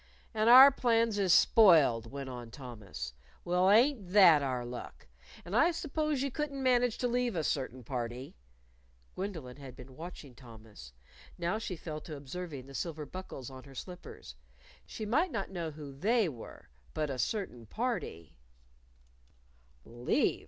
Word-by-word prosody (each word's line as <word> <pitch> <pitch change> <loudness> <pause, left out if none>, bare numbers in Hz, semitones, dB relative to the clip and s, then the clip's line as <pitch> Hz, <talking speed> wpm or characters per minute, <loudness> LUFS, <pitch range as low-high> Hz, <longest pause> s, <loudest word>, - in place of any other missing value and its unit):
"And 220 +1 +2
our 260 +3 +10
plans 230 -5 +1
is 190 -3 +2
spoiled," 155 - +5
went 140 -1 -6
on 120 -2 -8
Thomas. 105 - -8 0.3
"Well, 180 +2 +2
ain't 220 -3 +3
that 175 -7 +7
our 130 -3 -2
luck! 120 0 -9 0.4
And 180 +4 -5
I 320 +9 +5
suppose 305 -4 -2
you 280 - -2
couldn't 280 -1 -4
manage 245 -2 +2
to 250 - 0
leave 245 -2 0
a 160 - -1
certain 130 -3 -2
party 120 +2 -5 0.4
" - - -35
Gwendolyn 160 -11 -6
had 135 -3 -10
been 130 +1 -13
watching 160 -4 -9
Thomas. 110 - -14 0.4
Now 175 +5 -1
she 210 -4 -5
fell 155 -2 -7
to 155 - -8
observing 140 -1 -7
the 135 - -13
silver 155 +1 -4
buckles 165 -8 -8
on 130 0 -11
her 135 -1 -14
slippers. 180 - -9 0.5
She 215 - -6
might 305 - +2
not 195 -10 -4
know 170 -4 -4
who 150 -2 -9
"They" 215 - +1
were. 125 -8 -10 0.3
But 155 -2 -1
"a 130 - -5
certain 125 - -3
party" 215 - -4 1.5
"Leave?" 120 +1 0
160 Hz, 155 wpm, -31 LUFS, -, 1.5 s, our